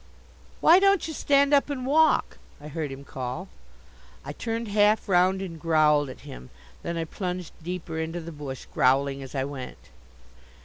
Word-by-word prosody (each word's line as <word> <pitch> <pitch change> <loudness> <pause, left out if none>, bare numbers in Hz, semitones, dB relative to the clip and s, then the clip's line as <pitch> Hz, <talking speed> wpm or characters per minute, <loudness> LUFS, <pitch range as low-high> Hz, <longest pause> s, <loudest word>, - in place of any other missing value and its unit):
"Why 345 +3 +7
don't 395 -3 +3
you 320 - -5
stand 280 0 +3
up 285 0 +4
and 260 -3 -3
walk?" 315 +4 +3 0.2
I 150 +1 -9
heard 155 -2 -4
him 135 +1 -8
call. 135 +8 -6 0.8
I - - -5
turned 230 -1 -4
half 210 +2 +3
round 190 +1 +3
and 165 -4 -7
growled 150 -3 +3
at 130 - -10
him. 60 +1 -11 0.3
Then 170 0 -4
I 165 - -2
plunged 180 0 -5
deeper 165 -1 -5
into 160 +2 -3
the 170 0 -8
bush, 145 -4 -7
growling 135 +1 +2
as 135 +1 -9
I 135 - 0
went. 135 -2 -8
170 Hz, 170 wpm, -26 LUFS, 145-215 Hz, 0.8 s, Why